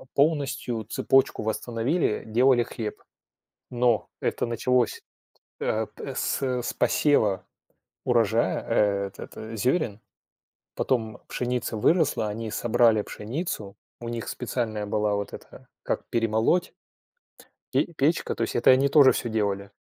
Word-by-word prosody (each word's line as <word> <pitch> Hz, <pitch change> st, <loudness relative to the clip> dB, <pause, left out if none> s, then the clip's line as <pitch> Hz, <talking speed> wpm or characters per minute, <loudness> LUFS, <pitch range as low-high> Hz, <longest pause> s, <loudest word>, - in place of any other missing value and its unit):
полностью 140 Hz, -6 st, +1 dB
цепочку 135 Hz, 0 st, +2 dB
восстановили, 115 Hz, +6 st, -1 dB
делали 120 Hz, +2 st, +4 dB
хлеб. 110 Hz, -2 st, -6 dB, 0.7 s
Но 120 Hz, -2 st, +1 dB
это -, -, -1 dB
началось, 120 Hz, +1 st, 0 dB, 0.6 s
э, 110 Hz, 0 st, -1 dB
п -, -, -8 dB
с -, -, -1 dB
с 125 Hz, -2 st, -1 dB
посева 105 Hz, -11 st, +2 dB, 0.6 s
урожая, 115 Hz, -2 st, +2 dB
э, 100 Hz, -3 st, +1 dB
этот 110 Hz, 0 st, -8 dB
зёрен. 125 Hz, -, 0 dB, 0.8 s
Потом 110 Hz, -4 st, -1 dB
пшеница 125 Hz, -1 st, -2 dB
выросла, 145 Hz, -2 st, +2 dB
они 110 Hz, +1 st, -4 dB
собрали 115 Hz, -1 st, +3 dB
пшеницу, 110 Hz, -, -5 dB, 0.2 s
у 120 Hz, 0 st, -6 dB
них 115 Hz, -1 st, -4 dB
специальная 110 Hz, -4 st, -3 dB
была 105 Hz, 0 st, 0 dB
вот 100 Hz, 0 st, -4 dB
эта, -, -, -12 dB, 0.2 s
как -, -, -2 dB
перемолоть. 115 Hz, -, +1 dB, 1.0 s
И -, -, +1 dB
печка- 155 Hz, +3 st, +1 dB
то -, -, -1 dB
есть -, -, -3 dB
это 120 Hz, -, +4 dB
они 135 Hz, +2 st, +4 dB
тоже 140 Hz, -2 st, +7 dB
всё 120 Hz, -, -2 dB
делали. 100 Hz, -2 st, -1 dB
115 Hz, 120 wpm, -26 LUFS, 110-130 Hz, 1.0 s, тоже